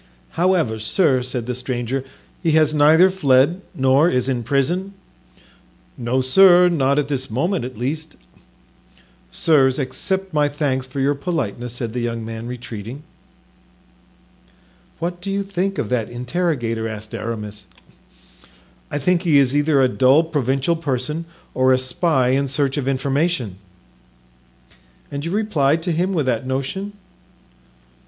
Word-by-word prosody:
"However, 170 -11 +1
sir," 130 - +2
said 125 -2 -4
the 125 - -3
stranger, 125 +1 -3 0.4
"he 165 -3 +1
has 155 -1 +4
neither 160 +5 +5
fled 145 0 +3
nor 135 +5 +3
is 125 -3 0
in 130 -3 -1
prison?" 160 - -1 1.0
"No, 125 +2 -1
sir, 180 +6 +6
not 140 -4 +1
at 145 -2 +1
this 135 -2 -3
moment 165 - -1
at 130 -3 -8
least." 155 +6 -4 1.1
"Sirs, 135 -5 +2
accept 190 +7 -3
my 150 -1 +2
thanks 140 -3 -2
for 130 +1 -6
your 140 +2 +2
politeness," 130 - -3
said 120 -2 -5
the 125 - -2
young 115 -1 -3
man, 115 +1 -6
retreating. 120 +2 -7 1.9
"What 175 +2 -4
do 195 - -5
you 200 0 -1
think 195 0 -2
of 105 - -2
that 115 -3 -1
interrogator?" 120 -3 -2
asked 110 +1 -8
Aramis. 105 -3 -6 1.2
"I 145 - -3
think 175 +4 +1
he 165 -6 +3
is 135 -1 +3
either 145 -1 +3
a - - +5
dull 130 +5 +4
provincial 140 0 0
person 150 +1 -3 0.3
or 130 0 +3
a 130 - +5
spy 130 +1 +1
in 135 +2 +1
search 135 0 0
of 140 -3 -3
information." 135 - -1 1.5
"And 140 0 -4
you 165 - -3
replied 165 -7 +1
to 175 - -1
him 175 +4 0
with 160 -7 0
that 125 0 -1
notion?" 140 +10 -3
135 Hz, 140 wpm, -20 LUFS, 125-165 Hz, 1.9 s, sir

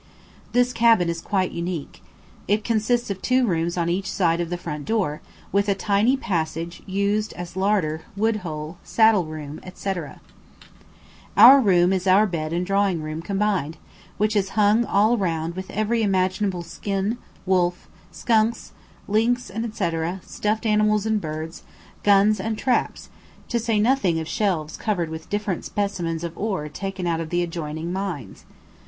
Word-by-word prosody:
This 245 0 +3
cabin 230 -7 +4
is 170 0 -3
quite 190 -3 0
unique. 170 -3 -5 0.5
It 210 +2 +1
consists 230 0 0
of 190 - -5
two 255 0 +2
rooms 170 -3 -1
on 170 -1 0
each 190 +3 -1
side 170 -2 +1
of 170 - -3
the 175 - -2
front 150 -4 -5
door, 190 -10 -1 0.3
with 200 +1 +2
a 200 - +3
tiny 210 +6 +2
passage 170 -5 -3
used 200 +2 0
as 175 0 -8
larder, 190 -5 +1 0.2
wood 220 +1 +2
hole, 160 -3 -6
saddle 220 -5 +4
room, 155 -1 -7 0.2
&c. 195 - -2 1.4
Our 250 +7 +10
room 180 -4 +4
is 190 0 -1
our 195 +3 +6
bed 160 -5 -3
and 175 +2 -1
drawing 195 -4 +1
room 155 +1 -4
combined, 195 -5 -1 0.4
which 215 +1 +1
is 195 -2 +1
hung 215 +3 +4
all 215 +4 +3
round 165 -2 -1
with 190 0 -6
every 215 +2 0
imaginable 190 -2 0
skin, 195 +6 -3 0.3
wolf, 180 -1 +1 0.2
skunks, 225 0 +1 0.4
lynx, 230 +3 +1
&c., 215 -5 -2 0.3
stuffed 215 +2 -2
animals 215 -1 +2
and 220 -1 +1
birds, 155 +1 -6 0.4
guns 205 +1 +4
and 220 +2 -2
traps, 250 +2 -1 0.4
to 235 - +1
say 225 -2 0
nothing 210 -8 +2
of 160 - -5
shelves 170 -8 -1
covered 180 -7 -1
with 160 +1 -8
different 205 -3 -2
specimens 175 -5 -2
of 170 -1 -5
ore 190 -8 -2
taken 195 +3 -5
out 165 -1 0
of 160 - -5
the 175 +1 +1
adjoining 165 0 -4
mines. 175 - -5
195 Hz, 155 wpm, -23 LUFS, 170-215 Hz, 1.4 s, Our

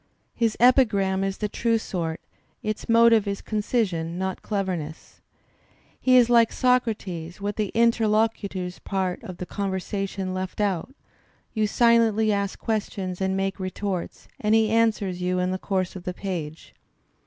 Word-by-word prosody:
His 230 -2 0
epigram 205 -6 +4
is 195 0 -2
the 210 - -1
true 230 +2 +1
sort; 170 -7 -4 0.4
its 215 +1 -4
motive 230 -2 +5
is 200 0 -2
concision, 200 -6 -1
not 190 0 -3
cleverness. 185 -7 -4 0.8
He 255 -1 +5
is 245 -2 +6
like 235 -2 +5
Socrates 205 -10 0
with 205 0 -3
the 210 -3 -2
inter 230 -1 +3
locutor's 205 -4 -1
part 190 -2 -2
of 185 -2 -8
the 180 - -5
conversation 195 0 -3
left 185 +1 -4
out; 200 +2 0 0.6
you 215 -2 +1
silently 225 -1 +3
ask 200 -1 -2
questions 200 -4 -3
and 190 0 0
make 195 0 -2
retorts, 185 -1 -4
and 210 +1 +2
he 220 -1 +3
answers 215 -5 +1
you 180 0 0
in 180 0 0
the 185 - -2
course 185 -2 -2
of 185 - -9
the 180 - -3
page. 170 -5 -5
200 Hz, 150 wpm, -25 LUFS, 185-220 Hz, 0.8 s, is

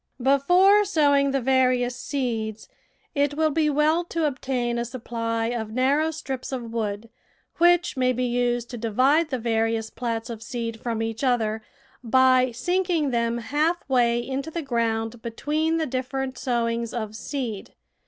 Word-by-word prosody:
Before 360 +10 +5
sowing 285 -7 +3
the 275 0 +1
various 250 -1 +2
seeds 230 -5 -3 0.5
it 285 -1 +1
will 310 0 +2
be 305 0 +2
well 305 +4 +2
to 335 -2 -1
obtain 255 -4 -1
a - - 0
supply 230 -2 -3
of 230 -3 -3
narrow 280 +6 +2
strips 270 -5 -5
of 235 -3 -5
wood, 215 -1 -3 0.5
which 345 0 +4
may 255 -1 +2
be 255 0 -1
used 245 -1 0
to 240 - -6
divide 265 +9 +2
the 260 - -1
various 225 -1 -1
plats 230 0 -3
of 225 -1 -7
seed 230 -2 -5
from 230 -2 -2
each 225 +2 -4
other, 225 -4 +1 0.4
by 255 +2 +4
sinking 340 +3 0
them 235 -1 0
half 300 +9 -1
way 240 -3 +3
into 270 +3 -3
the 330 0 -4
ground 230 -2 -1
between 305 +8 -1
the 320 - 0
different 260 0 -3
sowings 235 -2 -1
of 215 -2 -4
seed. 230 -5 -5
255 Hz, 155 wpm, -24 LUFS, 230-285 Hz, 0.5 s, Before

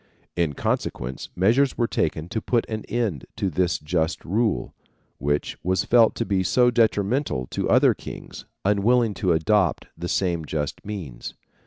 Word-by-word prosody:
In 85 -4 0
consequence 65 -1 -3
measures 120 +9 +3
were 120 - +2
taken 80 -6 -1
to 110 - -2
put 120 +1 0
an 110 -1 -4
end 110 - -2
to 100 -4 -1
this 90 +2 +1
just 80 +2 -2
rule, 100 - 0 0.5
which 75 +2 -1
was 95 +1 0
felt 115 -2 +5
to 115 - -2
be 95 -3 +1
so 125 +6 +3
detrimental 110 - +1
to - - -2
other - - +5
kings, - - -9 0.2
unwilling 110 +3 +3
to 95 -2 0
adopt 90 +3 +2
the 85 +2 -5
same 85 -4 0
just 75 -1 -3
means. 85 -13 -7
95 Hz, 155 wpm, -24 LUFS, 80-115 Hz, 0.5 s, felt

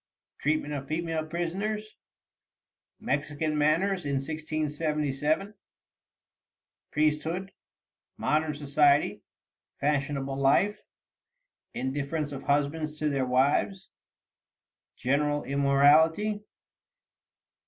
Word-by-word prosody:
Treatment 150 0 0
of 140 -1 -5
Female 160 0 -2
Prisoners. 195 +6 -2 1.1
Mexican 145 +2 -1
Manners 170 +6 +2
in 140 -1 -1
1677. 155 +3 -1 1.4
Priesthood. 155 +5 0 0.7
Modern 155 0 0
Society. 145 0 +3 0.6
Fashionable 140 -1 -1
Life. 140 +10 +3 0.9
Indifference 145 +3 -2
of 140 -1 -6
Husbands 150 +2 0
to 155 0 0
their 135 -3 0
Wives. 140 +9 +1 1.0
General 145 +3 0
Immorality. 155 +9 +3
150 Hz, 70 wpm, -28 LUFS, 140-160 Hz, 1.4 s, Society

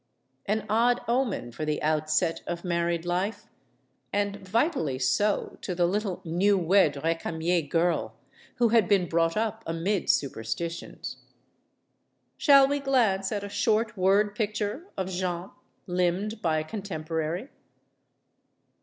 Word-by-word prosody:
An 210 +1 0
odd 235 +3 +3
omen 235 - 0
for 155 - -6
the 150 -1 -1
outset 155 +2 +1
of 175 0 -4
married 170 -1 -1
life; 185 +5 -2 0.7
and 205 0 0
vitally 190 - 0
so 135 +11 0
to 180 - -3
the 175 0 +3
little 195 +1 -1
new 190 +5 +2
wed 175 -4 +3
Recamier 165 +1 0
girl, 165 -9 0 0.4
who 240 -2 +3
had 225 -4 +4
been 190 -2 +3
brought 165 +1 +1
up 220 0 -1
amid 170 +4 -1
superstitions. 140 +6 -2 1.2
Shall 275 -3 +6
we 285 +1 0
glance 230 -9 +2
at 205 -2 -2
a - - -4
short 215 +2 +1
word 200 +2 +3
picture 215 - -2
of 190 -1 -1
Jeanne, 180 0 -3 0.3
limned 180 +5 -1
by 160 -2 +1
a 155 - 0
contemporary? 165 - -4
185 Hz, 125 wpm, -27 LUFS, 165-210 Hz, 1.2 s, Shall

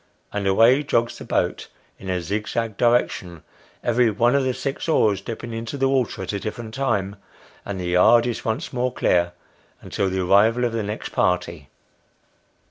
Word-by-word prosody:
and 100 -1 -2
away 115 +8 +5
jogs 120 -5 -1
the - - -8
boat - - -1 0.3
in 95 - -8
a 90 -1 0
zigzag 105 +5 -3
direction, 110 -8 0 0.4
every 120 0 +3
one 115 +4 +2
of 140 -1 +2
tho 130 - +1
six 135 +4 -4
oars 105 -10 +2
dipping 115 +2 -6
into 115 +4 -5
the 135 0 +2
water 135 -3 0
at - - -4
a 100 - -2
different 110 +1 -6
time; 105 -7 -1 0.5
and 100 -2 -5
the 90 -1 -3
yard 110 +7 +5
is 120 -2 -3
once 110 -1 -3
more 125 0 0
clear, 85 -7 +1 0.5
until 95 - -2
the 95 0 -2
arrival 105 +6 +3
of 120 - -1
the 115 - -1
next 105 +1 -5
party. 85 -5 -1
110 Hz, 175 wpm, -22 LUFS, 95-120 Hz, 0.5 s, away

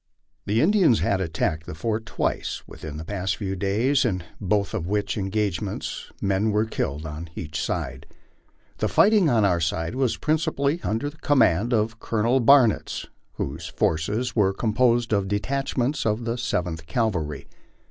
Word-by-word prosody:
The 105 +3 +2
Indians 170 - +4
had 95 -1 +1
attacked 80 -2 -2
the - - -6
fort 110 +5 -2
twice - - -2
within 75 -1 -8
the 80 - -7
past 95 0 -2
few 95 -2 -3
days, 110 +9 +2
in 95 -8 -1 0.2
both 100 +1 0
of 90 -6 -2
which 100 +1 -1
engagements 100 -1 -2
men 100 +2 +1
were 105 +1 +2
killed 75 -8 -3
on 80 +2 -6
each 80 -1 -4
side. - - -3 0.7
The - - +1
fighting 205 -6 +4
on 115 -5 +3
our 90 -3 +2
side 80 +1 -1
was 125 -3 0
principally 155 -1 0
under 115 +7 -1
the 155 - -21
command 120 - +3
of 115 0 0
Colonel 115 +4 +1
Barnitz, 125 -2 +4 0.3
whose 75 +4 -4
forces 105 +10 -1
were 100 -4 +3
composed 120 +1 +2
of 100 -2 +1
detachments 130 +5 -1
of 110 +2 0
the 115 0 -1
Seventh 90 -9 -2
Cavalry. 85 - -1
105 Hz, 155 wpm, -24 LUFS, 90-120 Hz, 0.7 s, Indians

